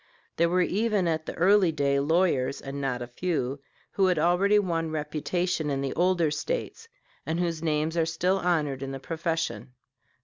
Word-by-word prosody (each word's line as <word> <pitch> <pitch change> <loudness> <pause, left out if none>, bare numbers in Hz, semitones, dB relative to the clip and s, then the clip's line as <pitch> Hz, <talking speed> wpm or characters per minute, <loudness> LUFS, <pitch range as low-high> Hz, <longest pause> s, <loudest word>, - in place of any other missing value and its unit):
There 170 0 +3
were 180 +1 +3
even 205 -1 +1
at 160 -1 -1
that - - -5
early 190 0 +4
day 140 -2 +1
lawyers, 150 -3 +1
and 140 +1 -6
not 125 -3 -2
a - - -7
few, 140 -1 -2 0.3
who 195 -1 +2
had 180 -2 +2
already 180 +6 +3
won 165 -5 0
reputation 155 +2 -2
in 135 -1 -1
the 135 -1 -2
older 175 -3 +2
States, 460 - -4 0.4
and 160 +2 -2
whose 170 -3 -1
names 155 0 0
are 165 -1 +1
still 180 +4 +1
honored 150 -7 0
in 135 0 -4
the 135 - -5
profession. 160 - -3
165 Hz, 175 wpm, -27 LUFS, 145-180 Hz, 0.4 s, early